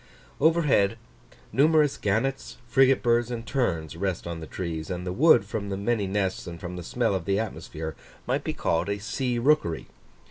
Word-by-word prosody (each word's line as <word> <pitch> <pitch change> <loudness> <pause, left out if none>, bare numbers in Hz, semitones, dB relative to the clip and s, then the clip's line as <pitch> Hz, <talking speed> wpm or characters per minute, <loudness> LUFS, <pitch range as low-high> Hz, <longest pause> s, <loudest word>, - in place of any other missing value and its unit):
Overhead, 145 -10 +3 0.6
numerous 150 0 +4
gannets, 115 +7 -1
frigate 135 +1 +4
birds, 120 0 +2
and 120 -1 -5
terns, 85 - -1
rest 95 0 -2
on 85 -1 -5
the 80 - -8
trees; 80 -4 -4
and 90 -1 -4
the 90 - -2
wood, 140 - +5
from 100 0 -4
the 95 - -2
many 105 0 0
nests 95 -1 -1
and 85 -1 -7
from 90 +1 -6
the 90 - -5
smell 115 +5 0
of 95 -3 -2
the 100 0 +1
atmosphere, 80 -6 -5 0.3
might - - 0
be - - -2
called 85 +4 0
a 100 - 0
sea 120 +4 -2
rookery. 120 - +2
100 Hz, 180 wpm, -26 LUFS, 90-125 Hz, 0.6 s, wood